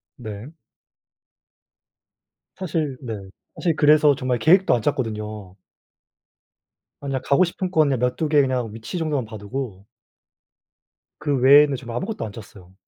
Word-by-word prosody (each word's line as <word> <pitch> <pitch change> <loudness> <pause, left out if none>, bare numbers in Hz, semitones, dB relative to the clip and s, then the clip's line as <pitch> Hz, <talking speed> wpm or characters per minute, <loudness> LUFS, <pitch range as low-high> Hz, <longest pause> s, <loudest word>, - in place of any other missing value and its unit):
네. 110 +2 -8 2.1
사실 155 -7 -2
네. 115 -4 -5 0.4
사실 170 -3 0
그래서 150 -1 +5
정말 125 -1 -2
계획도 185 +4 +4
안 120 - +1
짰거든요. 105 -7 -3 1.4
아니 140 -1 -5
그냥 130 - -2
가고 140 +6 +4
싶은 180 +1 -4
곳 160 -4 +3
그냥 135 -4 0
몇 125 0 0
2 160 - -1
개 150 -1 +4
그냥 125 -5 -1
위치 115 +9 -6
정도만 150 -6 -1
봐 110 0 -9
두고 105 -2 -6 1.3
그 145 -2 0
외에는 140 +2 +6
지금 120 -2 -8
아무것도 205 - -4
안 105 - -7
짰어요. 100 -4 -13
130 Hz, 260 characters per minute, -22 LUFS, 110-150 Hz, 2.1 s, 외에는